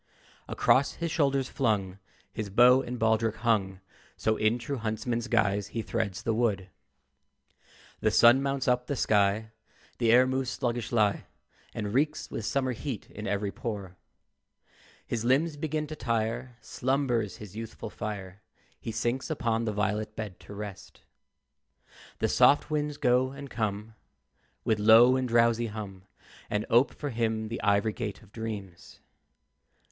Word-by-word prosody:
Across 140 +2 +2
his 170 -1 -4
shoulders 140 -4 +1
flung 100 -7 -1 0.3
His 110 -2 -4
bow 125 +5 +6
and 125 -1 -5
baldric 110 -1 +1
hung: 100 -5 0 0.4
So, 110 - +1
in 110 +2 +2
true 130 +4 -4
huntsman's 115 +2 -2
guise, 105 -4 +1
he 115 +1 -4
threads 105 -5 -3
the 115 - 0
wood. 105 -5 0 1.3
The - - +2
sun 120 +3 +6
mounts 135 -1 -1
up 125 0 +1
the 140 - -1
sky, 105 -1 +1 0.5
The 115 -2 +3
air 125 +2 +7
moves 130 0 -1
sluggishly, 120 -5 0 0.5
And 105 -2 -3
reeks 150 +4 0
with 110 - -4
summer 130 -2 0
heat 125 -2 -6
in 105 +2 -7
every 100 -1 -1
pore. 100 -6 -6 1.1
His 115 -2 -3
limbs 145 +6 +2
begin 155 0 -2
to 155 +1 -7
tire, 115 0 -2
Slumbers 125 -6 -1
his 105 -4 -11
youthful 110 -1 -7
fire; 100 -2 -6 0.4
He 115 - -5
sinks 120 +5 -2
upon 115 -6 -1
a - - +1
violet 105 +1 -2
bed 105 -5 -6
to 100 - -11
rest. 100 -2 -9 1.2
The - - +1
soft 145 +2 +4
winds 150 -1 -1
go 125 +1 +2
and 140 0 -9
come 110 0 -3 0.7
With 110 -1 +1
low 115 +4 +7
and 130 -1 0
drowsy 115 0 +3
hum, 100 -3 -8 0.4
And 105 +1 -1
ope 120 +4 +5
for 145 -2 -5
him 110 -2 -1
the 115 - -4
ivory 100 +1 +2
gate 110 -2 -5
of 100 - -20
dreams. 105 -6 -7
115 Hz, 145 wpm, -28 LUFS, 105-125 Hz, 1.3 s, air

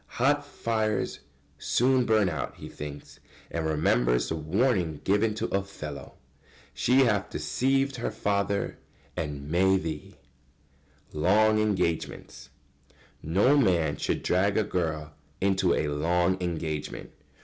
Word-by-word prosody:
"Hot 145 +4 +3
fires 110 -6 -2 0.4
soon 125 - +2
burn 110 -3 +3
out," 80 -7 -3
he - - -8
thinks, 75 0 -9 0.3
and 80 -1 -2
remembers - - +2
the 80 - -1
warning 85 - 0
given 105 +2 +2
to - - -2
Othello: 95 -7 -5 0.6
"She 130 +3 +3
hath 110 -6 +2
deceived 135 +1 0
her 120 - -2
father, 100 0 -1 0.4
and 75 -2 -4
may 95 +4 +3
thee." 80 -5 -6 0.9
[Sidenote: 75 - -5
Long 110 +1 +4
engagements.] 95 -6 -2 0.7
No 100 - +3
man 85 - +2
should - - -2
drag 100 +3 +2
a 110 - +3
girl 80 -6 -3 0.3
into 95 -2 +2
a 75 - 0
long 85 +5 +1
engagement. 80 -4 -4
95 Hz, 120 wpm, -27 LUFS, 80-110 Hz, 0.9 s, Long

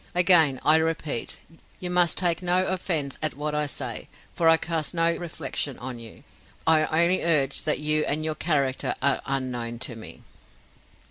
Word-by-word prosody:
Again 165 -7 +4
I 155 - +6
repeat, 160 -6 -2 0.4
you 180 -1 -4
must 175 -2 +2
take 175 -1 +2
no 180 +1 +2
offence 165 -7 -2
at 155 -5 -1
what 150 +1 -3
I 150 0 0
say, 130 -5 -5 0.3
for 165 -1 +3
I 165 - +6
cast 165 0 -3
no 165 0 +2
reflection 155 -5 -4
on 125 -1 -6
you; 115 -2 -11 0.4
I 160 +1 +3
only 180 +2 +3
urge 145 -5 +1
that 155 - +1
you 150 +1 +2
and 155 +2 -1
your 155 - 0
character 140 -5 -1
are 140 - +2
unknown 125 -3 -3
to 120 0 -5
me." 110 - -11
155 Hz, 170 wpm, -25 LUFS, 135-170 Hz, 0.4 s, I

